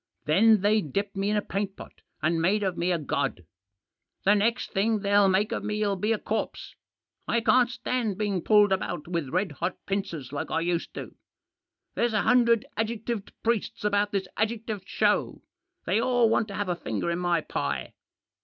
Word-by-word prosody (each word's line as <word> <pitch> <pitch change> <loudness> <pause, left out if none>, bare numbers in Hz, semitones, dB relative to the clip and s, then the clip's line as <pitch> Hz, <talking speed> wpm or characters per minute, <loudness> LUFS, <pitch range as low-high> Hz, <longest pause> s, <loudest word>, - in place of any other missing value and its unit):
Then 210 +7 +5
they 210 +2 +3
dipped 200 +6 -3
me 195 +1 0
in 210 - +1
a 205 - 0
paint 195 0 -3
pot - - -12 0.2
and 165 +1 +2
made 200 +5 +2
of 190 -2 -1
me 175 +2 0
a 175 - +2
god. 135 - -2 0.8
The 200 - +5
next 225 +4 +1
thing 215 +2 +1
they'll 200 0 +4
make 195 +3 +2
of - - -2
me'll 210 -1 0
be 210 +4 -1
a 225 - +2
corpse; 220 +1 -4 0.5
I 235 - +2
can't 245 +1 +4
stand 240 -5 -2
being 205 -4 -1
pulled 210 0 +5
about 185 -5 -2
with 170 -6 -2
red 180 +3 0
hot 170 +5 -3
pincers 170 -9 -3
like 145 - -3
I 165 - 0
used 170 0 -2
to. - - -7 0.8
There's 235 -1 0
a 210 - +2
hundred 235 -3 +4
adjec 225 0 -2
tived 225 -4 -3
priests 230 -3 -1
about 205 0 +2
this 195 -2 -1
adjectived 220 -2 -2
show. - - +1 0.4
They 210 +5 +2
all 245 -1 +3
want 225 -1 +2
to 200 - -7
have 205 0 -2
a 175 - +1
finger 140 +2 -3
in 170 - -1
my 175 -2 +1
pie. 70 - -3
200 Hz, 190 wpm, -27 LUFS, 175-215 Hz, 0.8 s, Then